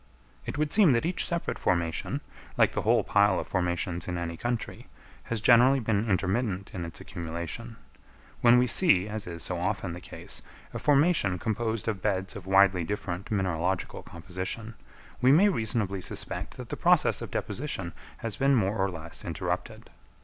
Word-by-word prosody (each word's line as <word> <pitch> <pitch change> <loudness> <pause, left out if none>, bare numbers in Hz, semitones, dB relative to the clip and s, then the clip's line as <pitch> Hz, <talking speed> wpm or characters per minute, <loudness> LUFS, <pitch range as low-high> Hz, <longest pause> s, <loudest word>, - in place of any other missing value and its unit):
It - - -4
would 150 0 0
seem 195 -10 +6
that 115 +5 +1
each 175 +2 0
separate 170 -1 -2
formation, 85 -3 -1 0.4
like - - +4
the - - -2
whole - - +3
pile 100 -2 +3
of - - -4
formations 90 -1 -1
in 90 -1 -2
any 85 -1 -3
country, 120 +5 -4 0.4
has 115 -2 -2
generally 125 +4 +6
been 110 -1 0
intermittent 100 +1 0
in 90 -3 -4
its 85 - -6
accumulation. 85 +6 -6 0.7
When 120 0 +7
we 125 - +4
see, 115 - +4
as 105 -2 -4
is 85 -1 -4
so 90 -2 -1
often 95 0 -2
the 90 - -8
case, - - -7 0.3
a - - -4
formation 145 - +3
composed 110 +3 -2
of 105 -4 -2
beds 95 -2 -1
of 95 -2 -9
widely 95 -2 +4
different 100 +1 -4
mineralogical 95 -2 -1
composition, 95 +6 -5 0.5
we 130 +1 +6
may 185 +8 +6
reasonably 110 - -1
suspect - - -3
that - - -8
the - - -3
process - - +3
of - - -5
deposition 95 - -3 0.2
has 115 -4 -4
been 135 +6 +3
more 105 -2 +1
or 95 0 +1
less 85 -2 -9
interrupted. - - -4
100 Hz, 170 wpm, -28 LUFS, 90-120 Hz, 0.7 s, When